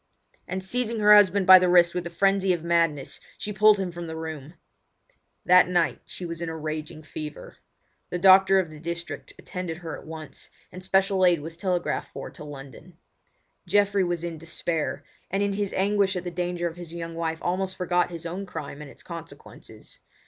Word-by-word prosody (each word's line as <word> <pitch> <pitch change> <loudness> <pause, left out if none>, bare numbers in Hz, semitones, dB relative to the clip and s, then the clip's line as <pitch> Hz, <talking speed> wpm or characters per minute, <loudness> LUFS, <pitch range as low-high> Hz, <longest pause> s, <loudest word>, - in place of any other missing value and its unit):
and 185 +1 -4
seizing 235 +3 -1
her 210 0 +6
husband 200 -2 +5
by 185 0 +10
the 180 0 +2
wrist 175 -1 +5
with 180 - -2
the - - -4
frenzy 195 +2 +2
of 170 -3 -1
madness, 165 -5 0 0.2
she 210 - -4
pulled 210 +1 +5
him 185 -2 -2
from 170 0 -7
the 160 - -6
room. 160 -1 -7 0.9
That 180 0 +6
night 175 -2 +1
she 180 - -6
was 170 0 -6
in 170 - -3
a 160 - -5
raging 155 0 -5
fever. 150 0 -8 0.5
The 180 - -2
doctor 190 +1 +6
of 170 -4 -2
the 155 - -11
district 170 +1 -6
attended 180 -4 -6
her 165 -2 -6
at - - -12
once, 155 -3 -8 0.2
and 185 0 -9
special 190 0 +2
aid 175 -4 +4
was 165 +2 -6
telegraphed 180 -1 -2
for - - -7
to - - -11
London. 145 +4 -11 0.7
Geoffrey 205 -1 +3
was 175 -2 -2
in 170 -2 -5
despair, 160 -3 -3 0.3
and 195 +2 0
in 200 0 0
his 200 -1 -2
anguish 200 0 +1
at 180 - -3
the 175 - -5
danger 175 0 -2
of 165 0 -7
his 175 -2 -8
young 165 -1 -6
wife 165 -1 -2
almost 185 +2 -2
forgot 180 -1 +1
his 170 -1 -8
own 185 +4 -5
crime 150 -4 -7
and 150 - -9
its - - -12
consequences. 165 -1 -11
175 Hz, 195 wpm, -25 LUFS, 165-190 Hz, 0.9 s, by